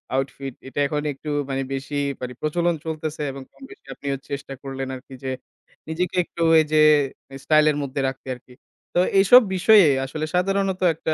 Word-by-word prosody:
Outfit' 135 -1 -3
এটা 140 - -5
এখন 150 +1 -2
একটু 150 +3 -9 0.2
মানে 135 0 -1
বেশি 140 +2 -4 0.2
মানে 125 0 -5
প্রচলন 170 +2 0
চলতেছে 155 -1 -4
এবং 135 0 -9
কম-বেশি 270 - -15
আপনিও 140 0 -3
চেষ্টা 140 -1 -5
করলেন 135 -1 -5
আরকি 130 +1 -12
যে, 130 - -2 0.6
নিজেকে 175 +3 -2
একটু 170 - -9
ওই 160 - +7
যে, 155 - +5 0.6
স্টাইল 155 -1 +4
এর 145 - -3
মধ্যে 140 0 -4
রাখতে 135 0 -6
আরকি। 125 0 -18 0.4
তো 175 - +2 0.2
এইসব 245 +6 +8
বিষয়ে 200 0 +6 0.2
আসলে 155 +4 -4
সাধারণত 195 +1 0
একটা 160 0 -2
150 Hz, 165 wpm, -23 LUFS, 135-170 Hz, 0.6 s, এইসব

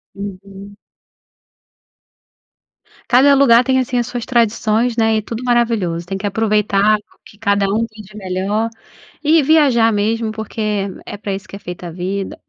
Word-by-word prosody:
Uhum. 200 0 -9 2.3
Cada 265 +3 +5
lugar 250 -3 +5
tem 260 +1 +2
assim, 255 0 -1
as 235 - -2
suas 245 -1 -5
tradições, 230 -1 +1
né, 225 -1 +3
e - - +2
é - - -5
tudo 230 +3 -6
maravilhoso. 230 -9 0
Tem 195 +2 -4
que 200 +1 -3
aproveitar 210 0 +2 0.3
que 210 - -17
cada 200 0 +1
um 215 +4 0
vive 210 -1 -13
melhor, 195 +3 -2 0.5
e 315 +1 +4
viajar 270 -7 +4
mesmo 220 +2 0
porque 220 +1 -6 0.4
é 205 - -7
pra 200 -1 -4
isso 195 +1 -7
que - - -10
é - - -9
feita 180 -2 -8
a - - -7
vida, 190 +3 -4
215 Hz, 160 wpm, -17 LUFS, 200-235 Hz, 2.3 s, Cada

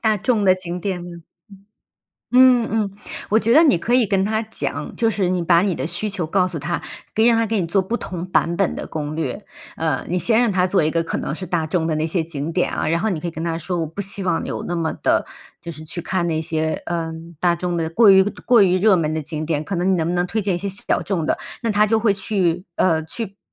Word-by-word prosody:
大 220 -2 +2
众 215 +1 +1
的 185 -1 +6
景 180 -1 -5
点， 180 -2 -3
嗯， 170 -1 -9 1.1
嗯 250 -2 +6
嗯， 215 -2 0 0.4
我 220 - +4
觉 230 +1 +2
得 315 +5 +7
你 285 - +4
可 230 +8 -2
以 250 -2 +5
跟 190 -1 +1
它 220 +2 0
讲， 220 0 -4
就 230 -2 +2
是 200 -4 0
你 180 -1 0
把 170 0 +4
你 190 -2 0
的 - - -3
需 175 +5 -1
求 190 -4 -2
告 185 +2 +2
诉 175 -4 -5
它， 175 +4 -3 0.3
可 220 - +1
以 - - +5
让 235 -1 +5
它 230 - +2
给 220 -1 0
你 170 - -2
做 195 +3 +2
不 190 +5 -2
同 180 -6 -6
版 170 -2 +1
本 195 -1 +1
的 - - -6
攻 150 -1 -4
略。 165 +6 -4 0.3
呃， 160 -5 -1
你 180 +1 0
先 225 +4 +2
让 240 -3 +2
它 185 -1 +2
做 185 -2 +2
一 155 - +1
个 165 0 +1
可 - - -3
能 - - -3
是 185 - -6
大 170 -2 -1
众 160 0 0
的 155 - 0
那 155 +1 0
些 165 +1 -1
景 155 -1 -5
点 180 - +1
啊， - - -1
然 165 +1 +1
后 220 - 0
你 180 -6 -2
可 175 - -4
以 - - -3
跟 160 0 -6
它 165 -1 -1
说， 175 +2 -3
我 165 - -1
不 165 +6 -6
希 200 0 -4
望 175 -3 0
有 - - -4
那 175 - -2
么 165 -2 -1
的 - - +1 0.4
就 170 - -6
是 155 -1 -10
去 175 +2 -5
看 175 0 -1
那 160 -1 0
些， 160 -1 -2
呃， 165 -2 -2 0.3
大 175 -1 +2
众 175 0 -2
的 160 -1 -1
过 210 +6 +5
于 190 0 +7 0.2
过 240 -3 +6
于 185 -1 +3
热 205 0 +5
门 155 -3 0
的 160 - -2
景 155 +1 -5
点， 155 -2 -1
可 195 - -4
能 180 +2 +1
你 - - +3
能 165 -2 0
不 175 - -1
能 175 0 +1
推 220 +4 -1
荐 195 -2 0
一 - - -2
些 200 +3 -4
小 195 +1 -1
众 180 -6 -2
的？ - - 0 0.2
那 230 -2 0
它 210 +1 +3
就 220 +1 +2
会 215 -2 +3
去， 190 -3 -1
呃， 160 -3 +2
去 200 +4 -7
180 Hz, 295 characters per minute, -21 LUFS, 165-205 Hz, 1.1 s, 得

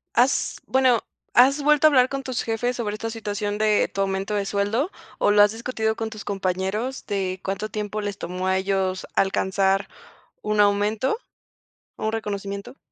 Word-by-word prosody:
¿Has 250 +3 +2
bueno, 255 -3 +3 0.3
has 275 +4 +6
vuelto 300 +1 +5
a - - +10
hablar 255 -3 +5
con 275 0 -4
tus 255 -2 -2
jefes 240 +2 -1
sobre 210 -4 -2
esta 225 +1 -4
situación 210 -2 -3
de 215 -1 +3
tu 195 - -5
aumento 195 +1 -1
de 200 -1 -1
sueldo, 210 - 0 0.3
o - - +3
lo 205 0 +7
has 205 - +5
discutido 225 -1 -2
con 225 - -3
tus 215 -2 -9
compañeros 195 +6 -2
de 190 -2 -2
cuánto 195 +2 -3
tiempo 210 0 -3
les 205 -1 -3
tomó 180 +2 -4
a 190 0 +2
ellos 190 -1 -1
alcanzar 195 +1 +2 0.5
un 210 0 +1
aumento 205 - +2 0.8
o - - -6
un 220 - 0
reconocimiento? 200 +1 -4
210 Hz, 170 wpm, -24 LUFS, 195-230 Hz, 0.8 s, a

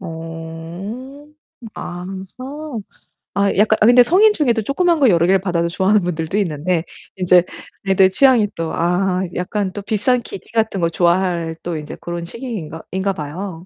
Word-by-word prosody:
어. 170 - -8 0.5
아하. 185 +2 -6 1.1
아 200 0 +2
약간 220 +1 +4
아 - - +6
근데 245 +2 +8
성인 405 - +5
중에도 245 - +1
조그만 335 - +1
거 270 - +5
여러 170 -2 +4
개를 190 +2 +4
받아도 170 -2 -1
좋아하는 190 +4 +2
분들도 170 +2 -2
있는데 165 -2 0 0.3
인제 180 -1 +4 0.4
애들 190 0 +5
취향이 240 -1 +4
또 165 -1 -3
아 180 +2 +1
약간 190 +2 -2
또 205 - -5
비싼 240 +5 +1
기기 195 - -10
같은 220 -4 0
거 170 - +2
좋아할 170 -1 +1
또 170 -2 -3
인제 150 -1 -7
고런 175 0 -5
시기인가 195 - -6
인가 190 +1 0
봐요. 170 +3 -6
190 Hz, 310 characters per minute, -19 LUFS, 170-215 Hz, 1.1 s, 근데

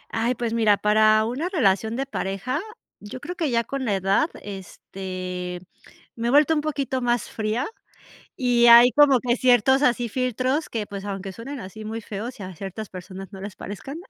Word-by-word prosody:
Ay, 235 +3 +1
pues 230 -1 -3
mira, 220 -3 +3
para 215 +1 +4
una 265 +10 -2
relación 220 - +1
de 270 +2 -2
pareja, 255 - -3 0.4
yo 210 +5 -9
creo 355 +6 -6
que 320 -4 -1
ya 235 -1 +1
con 275 +3 -4
la 215 -6 0
edad, 195 - +2
este, 185 -2 -6 0.6
me 230 0 -2
he - - +2
vuelto 300 +3 +5
un 300 - 0
poquito 275 -4 -2
más 240 -1 0
fría, 220 +5 -2 0.7
y 245 -2 +3
hay 235 +1 +9
como 290 -3 +6
que 240 0 +1
ciertos 255 +1 +4
así 245 -3 +2
filtros 255 +5 -1
que, 220 -3 -3
pues, 200 -1 -7
aunque 195 -1 -5
suenen 265 +7 -7
así 215 +1 -9
muy 220 +1 -4
feos, 225 +4 -7
y - - -6
a 185 -1 -8
ciertas 195 +4 -6
personas 185 +1 -9
no 190 - -9
les 200 0 -8
parezcan, 240 +9 -7
230 Hz, 185 wpm, -24 LUFS, 200-255 Hz, 0.7 s, hay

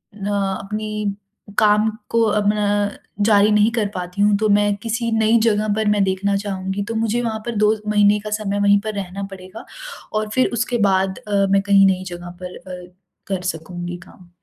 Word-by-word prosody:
न 200 -1 -7 0.3
अपनी 210 0 -3 0.4
काम 210 0 +4 0.2
को 230 - +2 0.2
अपना 210 0 +1 0.6
जारी 210 -1 +5
नहीं 210 +2 +4
कर 225 -3 0
पाती 180 +2 -4
हूँ, 205 0 +4
तो 215 - +1
मैं 205 0 +3
किसी 230 0 -2
नई 220 +1 +4
जगह 215 -1 +2
पर 220 -1 0
मैं 205 -1 +3
देखना 195 +1 0
चाहूँगी। 195 0 -3
तो 230 - -3
मुझे 225 +1 0
वहाँ 220 -2 -2
पर 235 - -3
2 210 +1 +3
महीने 210 0 +4
का 210 +1 -7
समय 205 -1 -1
वहीं 205 0 +5
पर 215 0 -4
रहना 195 0 -5
पड़ेगा 185 +3 -10 0.5
और 215 0 -1
फिर 255 - +3
उसके 240 +1 0
बाद 190 0 +1
अ, 200 -1 +2
मैं 195 0 +4
कहीं 200 -1 +5
नई 185 -1 0
जगह 175 0 -8
पर 180 - -7
अ, 180 -1 -10 0.3
कर 190 -2 -2
सकूँगी 175 +2 -7
काम। 180 -2 -18
205 Hz, 185 wpm, -20 LUFS, 190-215 Hz, 0.6 s, जारी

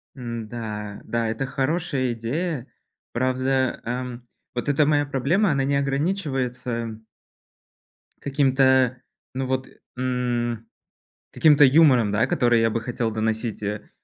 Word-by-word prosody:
М-да, 110 -4 -6
да, 115 -1 -1
это 115 +4 -2
хорошая 135 -1 -1
идея. 135 +4 -3 0.4
Правда, 130 +1 0
эм, 125 0 -4 0.3
вот 125 +4 -2
эта 145 +1 +3
моя 145 0 +2
проблема, 150 +8 +1
она 140 -2 +1
не 140 +1 +1
ограничивается 140 -3 -1
м 115 -1 -5 1.2
Каким-то, 130 -2 +3 0.3
ну 130 +1 -2
вот, 130 0 -1 0.3
м, 120 -2 -1 0.6
каким-то 150 -2 +5
юмором, 130 -6 +5
да, 105 +2 +2
который 120 -1 +3
я 115 - +3
бы 115 +1 -2
хотел 115 -1 -2
доносить, 110 0 -2
э. 105 +1 -4
125 Hz, 120 wpm, -24 LUFS, 115-135 Hz, 1.2 s, каким-то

